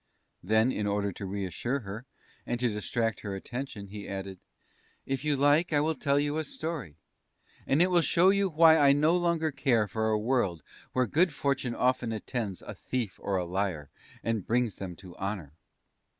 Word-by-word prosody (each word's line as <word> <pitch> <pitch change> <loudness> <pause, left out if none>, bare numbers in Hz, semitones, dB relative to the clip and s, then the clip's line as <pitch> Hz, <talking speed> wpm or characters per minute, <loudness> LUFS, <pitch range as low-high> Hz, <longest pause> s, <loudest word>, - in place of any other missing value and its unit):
Then, 110 +6 +3
in 105 -4 -2
order 100 0 0
to 100 +1 -7
reassure 100 +7 -2
her, 105 +5 -8 0.4
and 120 - -3
to 125 0 +2
distract 110 +1 -1
her 100 -2 -5
attention, 110 -1 -6
he 105 0 -8
added: 95 -1 -5 0.7
"If 135 0 -2
you 150 -1 +2
like, 145 +5 +3
I 145 - +4
will 155 +2 +1
tell 140 0 +1
you 145 +1 0
a - - -1
Story, 155 - -5 0.7
and 150 +5 +4
it 185 - +1
will 175 -1 +5
show 175 +3 +4
you 200 -1 +2
why 160 0 +6
I 140 -1 +6
no 155 +4 +3
longer 170 -3 +1
care 120 -6 +2
for 110 +1 -1
a 110 - +2
world 105 - 0 0.3
where 130 0 +2
good 165 - +2
fortune 135 -3 -1
often 125 -2 +1
attends 110 -3 -4
a - - -7
thief 120 -7 -4
or 100 - -1
a 90 - -1
liar, 90 -5 -2 0.3
and 115 -3 -1
brings 120 -2 +1
them 95 -3 -6
to 90 0 -12
honour." 95 -7 -4
120 Hz, 185 wpm, -29 LUFS, 100-145 Hz, 0.7 s, why